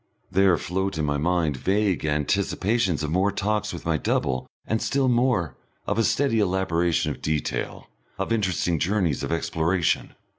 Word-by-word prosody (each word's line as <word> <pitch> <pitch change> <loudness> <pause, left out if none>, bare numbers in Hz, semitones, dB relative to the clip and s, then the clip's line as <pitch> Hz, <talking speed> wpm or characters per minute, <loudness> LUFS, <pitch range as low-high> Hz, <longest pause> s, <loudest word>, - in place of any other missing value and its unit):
There 95 -2 +4
float 95 0 -2
in 80 - 0
my 75 0 0
mind 80 -3 +1
vague 95 +2 0
anticipations 95 +4 0
of 75 - -2
more 95 +4 +2
talks 105 +1 -1
with - - -8
my - - +1
double 65 -1 -1 0.2
and 110 0 -1
still 135 -1 +1
more, 120 - +2 0.3
of - - -1
a - - +4
steady 130 -2 +2
elaboration 90 -4 +1
of - - -8
detail, 80 -1 -2 0.3
of 95 +4 -1
interesting 90 -6 0
journeys 90 -4 0
of - - -3
exploration. 85 +1 0
95 Hz, 155 wpm, -25 LUFS, 80-105 Hz, 0.3 s, There